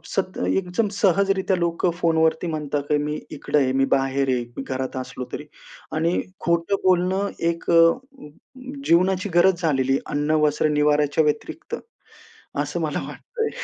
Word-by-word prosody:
सत 190 -1 -1
एकदम 190 +4 0
सहजरीत्या 195 -1 +2
लोकं 170 +1 0
फोनवरती 160 0 +2
म्हणतात, 150 -3 -2
की 150 - +3
मी 150 +1 -3
इकडं 150 - -1
आहे, 130 -2 +2
मी 135 0 +3
बाहेर 135 0 +1
आहे, 125 -1 0
मी - - -3
घरात 130 -1 -4
असलो 130 0 -5
तरी 150 - -5 0.5
आणि 165 +3 +1 0.2
खोटं 170 +3 +1
बोलणं 185 +2 +2 0.2
एक 170 0 -4
अ, - - +3
अ, 250 - +3
अ, - - -11 0.6
जीवनाची 185 +3 +3
गरज 175 0 +4
झालेली 135 -5 +1
आहे. 135 - +1
अन्न, 145 +1 0
वस्त्र, 150 +1 +2
निवार्‍याच्या 150 0 +2
व्यतिरिक्त 150 0 -2 0.9
असं - - -3
मला - - -1
वाटतंय. 450 -2 -4
165 Hz, 155 wpm, -23 LUFS, 145-185 Hz, 0.9 s, गरज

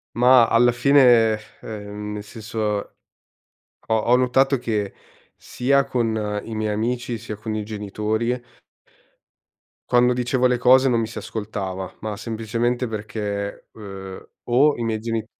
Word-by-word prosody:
Ma 125 0 +6
alla 120 +1 +4
fine, 120 -3 +5 0.2
ehm, 105 -1 -7
nel 105 0 -6
senso 110 +2 -8
ho 105 -1 -4 0.8
ho 115 +3 +3
notato 130 +2 +3
che, 105 -4 -2 0.5
sia 140 +2 +1
con 110 -5 -1
i 115 - -7
miei 110 -1 -1
amici, 120 +2 -2
sia 110 -1 -7
con 110 +1 -4
i 105 - -2
genitori 110 +3 -2 1.5
quando 125 0 +4
dicevo 125 +1 +1
le 125 0 +1
cose 130 +2 +5
non 120 -2 +2
mi 115 - -1
si 110 - -10
ascoltava, 95 -4 -5
ma 110 -2 -4
semplicemente 115 +2 -2
perché, 105 -2 -5
ehm, 95 -3 -9 0.2
o 140 +5 +4
i 120 - -4
miei 110 -1 -1
geni 115 -1 -3
115 Hz, 135 wpm, -22 LUFS, 105-125 Hz, 1.5 s, Ma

